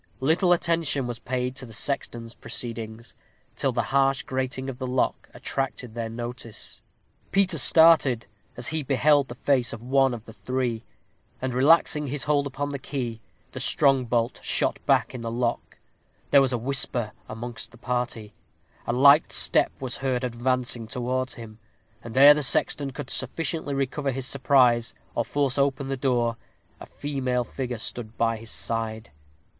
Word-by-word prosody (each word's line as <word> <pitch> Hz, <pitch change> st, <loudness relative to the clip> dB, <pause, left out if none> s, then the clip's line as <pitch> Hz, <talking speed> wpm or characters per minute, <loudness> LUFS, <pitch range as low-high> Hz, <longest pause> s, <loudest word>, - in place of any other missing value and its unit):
Little 165 Hz, +7 st, +2 dB
attention 165 Hz, -5 st, +1 dB
was 120 Hz, -2 st, -5 dB
paid 125 Hz, +1 st, -3 dB
to 130 Hz, -, -4 dB
the 115 Hz, -, -11 dB
sexton's 120 Hz, -2 st, -3 dB
proceedings, 115 Hz, -1 st, -5 dB, 0.4 s
till 135 Hz, -, 0 dB
the 120 Hz, -1 st, -1 dB
harsh 135 Hz, -1 st, +3 dB
grating 130 Hz, 0 st, -3 dB
of 135 Hz, -1 st, -6 dB
the 130 Hz, -, -3 dB
lock 125 Hz, 0 st, -1 dB
attracted 130 Hz, -3 st, -4 dB
their 115 Hz, -1 st, -4 dB
notice. 120 Hz, -1 st, -7 dB, 0.5 s
Peter 185 Hz, -4 st, +2 dB
started 155 Hz, -6 st, +5 dB, 0.3 s
as 120 Hz, -, -1 dB
he 160 Hz, 0 st, 0 dB
beheld 140 Hz, +1 st, +3 dB
the 120 Hz, -, -8 dB
face 130 Hz, -2 st, +1 dB
of 115 Hz, -, -8 dB
one 135 Hz, 0 st, +2 dB
of 115 Hz, -, -11 dB
the 110 Hz, -, -12 dB
three, 125 Hz, -1 st, -2 dB, 0.6 s
and 130 Hz, -1 st, -3 dB
relaxing 150 Hz, +2 st, +4 dB
his 140 Hz, +1 st, -3 dB
hold 145 Hz, -1 st, +1 dB
upon 145 Hz, +1 st, -4 dB
the 140 Hz, -1 st, -4 dB
key, 125 Hz, -5 st, -5 dB, 0.3 s
the -, -, -7 dB
strong 135 Hz, -2 st, +3 dB
bolt 115 Hz, 0 st, -1 dB
shot -, -, 0 dB
back -, -, +2 dB
in 125 Hz, -, -6 dB
the 115 Hz, -, -4 dB
lock. 120 Hz, 0 st, -3 dB, 0.5 s
There 140 Hz, -, +7 dB
was 135 Hz, -2 st, +1 dB
a 125 Hz, -, 0 dB
whisper 120 Hz, -2 st, +1 dB, 0.2 s
amongst 115 Hz, 0 st, -6 dB
the 115 Hz, -, -17 dB
party. 120 Hz, -3 st, -3 dB, 0.5 s
A 120 Hz, -, 0 dB
light 140 Hz, +5 st, +6 dB
step -, -, +5 dB
was 130 Hz, -2 st, -3 dB
heard 130 Hz, -2 st, -1 dB
advancing 125 Hz, -1 st, -1 dB
towards 130 Hz, +2 st, -3 dB
him; 110 Hz, -2 st, -11 dB, 0.4 s
and 115 Hz, +1 st, -7 dB
ere 140 Hz, +2 st, +10 dB
the 150 Hz, -, -2 dB
sexton 140 Hz, +1 st, +1 dB
could 135 Hz, -, -7 dB
sufficiently 150 Hz, +2 st, -2 dB
recover 135 Hz, +1 st, -1 dB
his 130 Hz, 0 st, -2 dB
surprise, 125 Hz, -3 st, +3 dB, 0.2 s
or 115 Hz, -, 0 dB
force 140 Hz, +1 st, -1 dB
open 140 Hz, 0 st, +1 dB
the 135 Hz, 0 st, -2 dB
door, 120 Hz, -3 st, 0 dB, 0.4 s
a -, -, -10 dB
female 130 Hz, -4 st, -2 dB
figure 125 Hz, 0 st, -5 dB
stood 110 Hz, 0 st, -6 dB
by 115 Hz, -1 st, +1 dB
his 110 Hz, +1 st, -10 dB
side. 115 Hz, -1 st, -2 dB
130 Hz, 165 wpm, -25 LUFS, 120-140 Hz, 0.6 s, ere